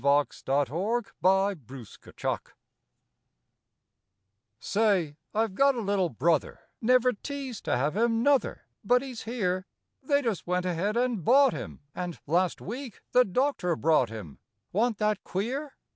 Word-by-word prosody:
HIS 140 +1 +2
NEW 155 - +1 0.2
BROTHER 185 - +1 2.7
Say, 195 - +1 0.2
I've 220 -2 0
got 275 +5 +4
a - - -2
little 200 -4 +1
brother, 155 +5 0 0.2
Never 250 +1 +4
teased 270 0 -6
to - - +1
have 145 +6 0
him, 230 +1 +2
nuther, 285 -1 +2 0.2
But 245 +5 +3
he's 255 -4 -7
here; 185 -5 -1 0.3
They 285 +1 +1
just 225 -8 -2
went 180 0 0
ahead 185 +5 -1
and 240 -6 0
bought 270 - +5
him, - - -7
And, 180 -2 -5
last 175 +4 +1
week 245 +3 -7
the 250 - +6
doctor 200 - 0
brought 155 -7 +3
him, 105 -10 -9 0.3
Wa'n't 225 +3 +1
that 210 0 0
queer? 265 +9 -3
205 Hz, 130 wpm, -28 LUFS, 170-245 Hz, 2.7 s, the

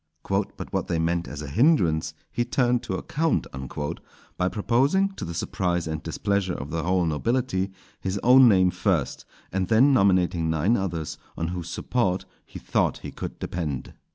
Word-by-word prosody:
"But 95 +1 -2
what - - -1
they 85 - 0
meant 85 +1 0
as 75 +1 -6
a - - -6
hindrance, 90 - +2 0.2
he 120 - 0
turned 120 0 +1
to 95 - -4
account," 160 - 0 0.9
by 90 - +1
proposing, 135 - +2
to 195 - -8
the 85 0 -5
surprise 90 -1 -1
and 80 -1 -3
displeasure 95 +2 -1
of 70 - -6
the 80 +1 -1
whole 90 +2 +1
nobility, 95 - 0 0.3
his 95 +1 -2
own 125 +1 +8
name 95 -3 +4
first, - - -1 0.3
and 95 -1 -1
then 125 +7 +5
nominating 90 -7 +3
nine 80 +9 +2
others 85 -7 -3 0.2
on 85 0 -2
whose 85 -1 -5
support 95 0 -1 0.2
he - - -11
thought - - 0
he - - -5
could - - -6
depend. 75 -7 -4
95 Hz, 165 wpm, -25 LUFS, 85-120 Hz, 0.9 s, own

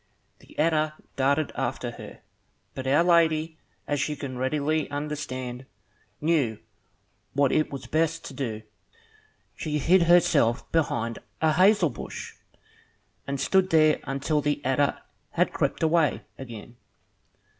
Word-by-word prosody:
The - - -19
adder 155 -1 +2 0.2
darted 140 +2 +1
after - - -3
her; - - -11 0.5
but 130 0 -5
Our 145 +5 +4
Lady, 160 -2 +2 0.3
as 145 0 0
you 150 - -2
can 135 -2 -6
readily 150 +4 0
understand, 135 -4 -5 0.5
knew 145 -9 +1 0.8
what 140 -1 +3
it 155 - +1
was 140 - -6
best 165 +1 0
to - - -7
do. 110 -6 -4 0.9
She 150 -2 -2
hid 175 +5 +4
herself 170 -9 +4
behind 115 -8 0 0.2
a 160 -1 +3
hazel 185 -3 +4
bush, - - -7 0.9
and 140 0 -2
stood 190 +6 +2
there 155 -2 +4
until 140 +3 0
the 145 0 0
adder 135 +2 +1 0.3
had - - +1
crept - - -1
away 160 -3 +2
again. 120 -2 -10
150 Hz, 125 wpm, -26 LUFS, 135-160 Hz, 0.9 s, Our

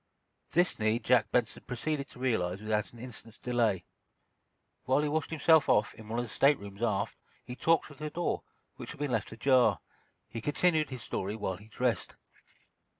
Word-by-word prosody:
This 175 -3 +2
need 110 +2 +1
Jack 125 -3 +4
Benson 120 -2 0
proceeded 140 +3 -2
to - - -14
realize 95 -8 0
without 105 0 -1
an 120 - -15
instant's 115 -2 -9
delay. 115 -7 0 1.0
While 135 +3 +3
he - - +1
washed 155 +1 -1
himself 160 0 +4
off, 105 - +3
in 110 -1 -13
one 115 - -2
of 120 - 0
the - - -10
staterooms 105 -8 +1
aft, 105 -4 0 0.3
he 125 - -6
talked 165 +5 +3
through 145 - -13
the 150 +1 -4
door, 175 +3 -1 0.4
which - - -7
had 150 - -15
been 145 -2 -1
left - - -1
ajar. 120 -4 +3 0.5
He 115 - -6
continued 155 +3 +2
his 130 -3 -6
story 100 +3 -3
while 95 -4 -3
he 105 +3 -15
dressed. 125 +1 -1
120 Hz, 180 wpm, -31 LUFS, 110-145 Hz, 1.0 s, Jack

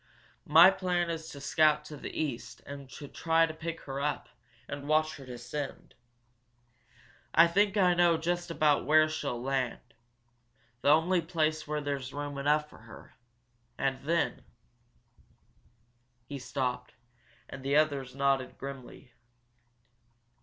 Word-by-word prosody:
My 165 +5 +8
plan 180 -3 -1
is 160 -1 -5
to 140 - -9
scout 150 +1 +2
to 150 - -8
the - - -7
east 140 -7 -4
and 140 -1 -9
try 165 +4 0
to 160 - -6
pick 160 +1 -6
her 135 0 -5
up 145 -1 -2 0.4
and 145 0 -6
watch 155 +1 +2
her 135 -2 -12
descend. 125 +3 -6 1.4
I 165 - +8
think 200 +4 +2
I 180 -3 +5
know 175 -1 +4
just 175 +2 -2
about 155 -3 +2
where 155 +1 +6
she'll 145 -6 -3
land 130 -1 -1 1.0
the - - +2
only 165 +4 +4
place 155 -2 -1
where 150 0 -2
there's 140 -2 -4
room 145 -1 -4
enough 150 +2 +2
for - - -16
her. 115 +1 -14 0.6
And 135 -1 -1
then 165 +3 0 1.0
" 120 +2 -38
He 140 - -5
stopped, 125 -1 -3 0.5
and 135 - -9
the 140 +2 0
others 140 -4 +1
nodded, 135 -1 0
grimly. 135 -1 -9
150 Hz, 135 wpm, -30 LUFS, 135-160 Hz, 1.4 s, My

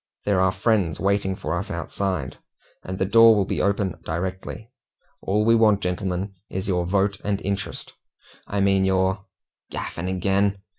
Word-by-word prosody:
There 100 -3 +2
are 95 0 +3
friends 95 -5 +1
waiting 100 -1 +1
for - - -3
us - - -4
outside, 95 -10 -3 0.4
and 95 0 -5
the 95 - +1
door 115 +3 +7
will 100 -2 +2
be - - -2
open 100 -3 0
directly. 95 +7 -5 0.5
All 105 +2 +1
we 115 - +5
want, 110 -3 +4
gentlemen, 95 +1 -2 0.2
is 95 +2 -4
your 90 -3 0
vote 100 +1 +1
and 100 -1 0
interest 100 +1 -4 0.5
I 100 0 -1
mean 95 -1 +3
your 95 +1 +1 0.2
" - - -48
"Gaffing 90 +2 -4
agin!" 100 +2 +1
95 Hz, 160 wpm, -24 LUFS, 95-100 Hz, 0.5 s, door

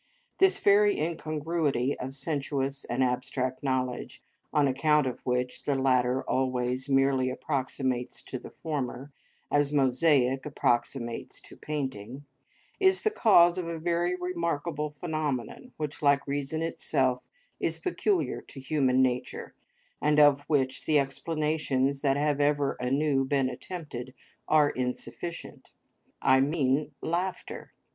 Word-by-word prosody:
This 385 0 +4
very 205 +1 +4
incongruity 155 -4 -1
of 130 +1 -5
sensuous 140 -1 -3
and 125 +2 0
abstract 130 +1 -1
knowledge, 130 -3 -2 0.3
on 145 -2 +3
account 150 +2 +3
of 125 - -3
which 125 0 -1
the 140 - +1
latter 130 -1 +2
always 130 0 -1
merely 135 -1 +3
approximates 130 -2 -2
to - - -6
the - - -10
former, 140 -3 -4 0.4
as 145 -1 +2
mosaic 135 -1 +3
approximates 120 -4 -1
to - - -14
painting, 135 -3 -5 0.5
is 380 -1 +3
the 435 - +2
cause 180 - +5
of 175 - -4
a 165 0 -3
very 175 +2 0
remarkable 170 -4 -2
phenomenon 155 - -4
which, 150 -2 -5
like 140 -1 +3
reason 145 +3 -2
itself, 130 -6 0 0.4
is - - 0
peculiar 370 +1 0
to 135 - -12
human 130 -2 +2
nature, 125 -1 -2 0.5
and 150 0 +3
of 145 -1 +6
which 135 -4 0
the 155 - +4
explanations 140 -1 0
that 140 -1 +2
have 145 0 +1
ever 145 -1 +2
anew 135 +2 +1
been 135 -1 +1
attempted, 130 -4 -7 0.3
are 150 -2 +4
insufficient: 130 +7 -5 0.5
I 130 0 +5
mean 145 0 +1
laughter. 180 +3 -3
140 Hz, 125 wpm, -28 LUFS, 130-155 Hz, 0.5 s, of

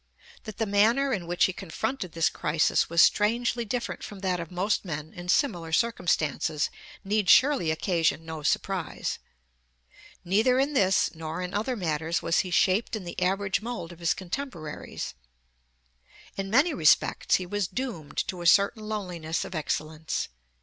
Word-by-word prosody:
That 215 -2 -8
the 225 - 0
manner 230 +7 +3
in 180 -6 -3
which 175 0 +1
he 185 - -1
confronted 190 +3 -4
this 165 -1 +2
crisis 155 +1 +1
was 170 0 +6
strangely 235 +3 +2
different 205 -5 -3
from 200 -2 -8
that 185 -2 0
of 170 -1 -6
most 185 +4 0
men 155 -4 -6
in 180 -1 -9
similar 175 - +1
circumstances 160 -7 0 0.3
need 205 -1 0
surely 270 - +5
occasion 165 0 0
no 160 -1 -6
surprise. 180 +4 -1 1.1
Neither 220 +8 +3
in 275 +3 +1
this 195 -7 +3
nor 160 +2 -5
in 180 - -5
other 225 +5 -1
matters 165 -3 -1
was 165 - +2
he 185 - -1
shaped 190 +5 +2
in 215 - -5
the 175 +1 -6
average 195 +2 +1
mold 230 -7 -5
of 175 - -13
his 170 -1 +1
contemporaries. 180 - -6 1.2
In 195 0 -4
many 280 - +4
respects 155 - +3
he 185 - -1
was 205 +1 -1
doomed 200 - -5
to 180 -2 -5
a 175 - 0
certain 215 +4 +3
loneliness 175 -6 -3
of - - -8
excellence. 155 0 -3
185 Hz, 155 wpm, -27 LUFS, 165-215 Hz, 1.2 s, was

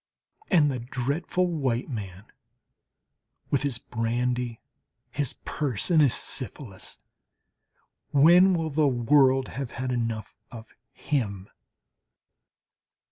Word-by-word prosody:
And 150 -5 +4
the 130 - -3
dreadful 140 +9 -1
white 135 -9 -1
man 100 -6 -7 1.3
with 140 - +2
his 140 -5 -1
brandy, 120 0 -2 0.5
his 145 -4 -2
purse, 140 - -1
and 160 -2 +6
his 140 -5 +4
syphilis! 125 -6 -6 1.1
when 175 +6 +6
will 160 -2 -2
the 150 +1 +3
world 130 +1 +3
have 135 -2 -5
had 130 +1 -4
enough 115 -3 -3
of 115 -2 -11 0.2
him? 100 -9 -3
130 Hz, 100 wpm, -26 LUFS, 115-145 Hz, 1.3 s, and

